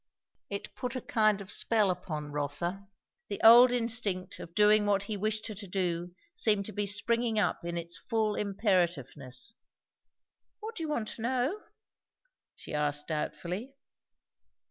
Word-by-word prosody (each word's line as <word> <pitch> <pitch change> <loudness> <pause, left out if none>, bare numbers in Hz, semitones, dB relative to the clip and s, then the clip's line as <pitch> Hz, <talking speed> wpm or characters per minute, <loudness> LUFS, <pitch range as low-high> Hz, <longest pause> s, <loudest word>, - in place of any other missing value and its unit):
It 200 0 -5
put 255 0 -4
a 255 - -3
kind 215 -2 +2
of 195 - -8
spell 215 -4 +2
upon 155 -5 -5
Rotha. 160 +7 -3 0.4
The 200 - -4
old 240 +3 +9
instinct 220 -6 0
of 170 - -10
doing 210 0 +5
what 200 -1 +2
he 210 +1 -3
wished 215 +2 -1
her 220 - -4
to 200 0 -8
do 175 -2 -2 0.2
seemed 210 - +2
to 215 - -5
be 205 0 -2
springing 225 +3 +1
up 210 - +1
in 170 0 -3
its 170 0 -4
full 220 -3 0
imperativeness. 175 - -1 1.1
"What 445 +1 -6
do 345 - -5
you 315 - -3
want 235 -8 -1
to - - -8
know?" 260 - 0 0.9
she - - -10
asked 150 0 -1
doubtfully. 180 - -4
205 Hz, 150 wpm, -30 LUFS, 175-225 Hz, 1.1 s, old